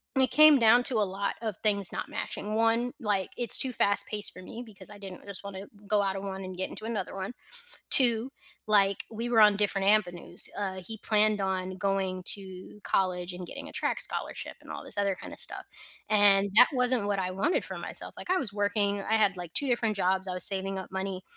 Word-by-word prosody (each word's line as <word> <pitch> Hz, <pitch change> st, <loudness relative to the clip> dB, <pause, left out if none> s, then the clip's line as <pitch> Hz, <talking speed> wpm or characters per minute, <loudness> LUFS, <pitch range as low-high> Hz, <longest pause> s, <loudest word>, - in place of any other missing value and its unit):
it 265 Hz, -1 st, +2 dB
came 305 Hz, -2 st, +7 dB
down 235 Hz, +2 st, +5 dB
to 260 Hz, -, +1 dB
a 215 Hz, -, +2 dB
lot 200 Hz, +1 st, -3 dB
of 220 Hz, -4 st, -4 dB
things 200 Hz, -3 st, +2 dB
not -, -, -5 dB
matching. 210 Hz, +1 st, -5 dB
1, 230 Hz, +2 st, +1 dB
like, 205 Hz, -6 st, -2 dB
it's 240 Hz, -2 st, +7 dB
too 260 Hz, -, +3 dB
fast 200 Hz, -2 st, +3 dB
paced 210 Hz, -1 st, +2 dB
for 185 Hz, -, -12 dB
me 225 Hz, +5 st, -9 dB
because 200 Hz, -3 st, -11 dB
I 205 Hz, -, -12 dB
didn't 190 Hz, -2 st, -9 dB
just 200 Hz, -1 st, -6 dB
want 200 Hz, -1 st, -8 dB
to 195 Hz, +1 st, -9 dB, 0.2 s
go 205 Hz, 0 st, +2 dB
out 195 Hz, -1 st, -2 dB
of 195 Hz, -, -5 dB
one 195 Hz, -1 st, -6 dB
and 185 Hz, 0 st, -8 dB
get 190 Hz, -, -3 dB
into 215 Hz, -, -9 dB
another 215 Hz, -5 st, -4 dB
one. 195 Hz, +4 st, -5 dB, 0.6 s
2, 240 Hz, 0 st, +2 dB, 0.4 s
like, 200 Hz, -2 st, +2 dB
we 230 Hz, +2 st, -4 dB
were 230 Hz, -2 st, +4 dB
on 210 Hz, -1 st, +6 dB
different 195 Hz, -1 st, -1 dB
avenues, 185 Hz, -5 st, +3 dB
uh, 190 Hz, -2 st, -4 dB
he 220 Hz, -1 st, -6 dB
planned 215 Hz, -1 st, +2 dB
on 185 Hz, -1 st, -3 dB
going 195 Hz, -2 st, -2 dB
to 190 Hz, 0 st, -6 dB
college 180 Hz, -1 st, -1 dB
and 180 Hz, 0 st, -8 dB
getting -, -, -8 dB
a -, -, -12 dB
track -, -, -2 dB
scholarship -, -, -3 dB
and -, -, -16 dB
all -, -, -7 dB
this -, -, -4 dB
other 200 Hz, -1 st, 0 dB
kinda -, -, -10 dB
stuff -, -, -3 dB, 0.5 s
and 200 Hz, -1 st, +5 dB
that 250 Hz, +3 st, +9 dB
wasn't 250 Hz, -3 st, +1 dB
what 205 Hz, -1 st, -1 dB
I 185 Hz, -1 st, -3 dB
wanted 195 Hz, -, -1 dB
for -, -, -7 dB
myself, -, -, -2 dB
like, -, -, -10 dB
I 370 Hz, -, +2 dB
was 235 Hz, -, 0 dB
working, 205 Hz, -1 st, 0 dB
I 220 Hz, -, -1 dB
had 205 Hz, -3 st, +2 dB
like 175 Hz, -2 st, -8 dB
2 285 Hz, -, 0 dB
different 235 Hz, -4 st, 0 dB
jobs, 190 Hz, 0 st, 0 dB
I 185 Hz, -, -3 dB
was 180 Hz, -, +2 dB
saving 195 Hz, 0 st, +1 dB
up 190 Hz, -, -10 dB
money, 190 Hz, -1 st, -4 dB
200 Hz, 225 wpm, -27 LUFS, 190-220 Hz, 0.6 s, that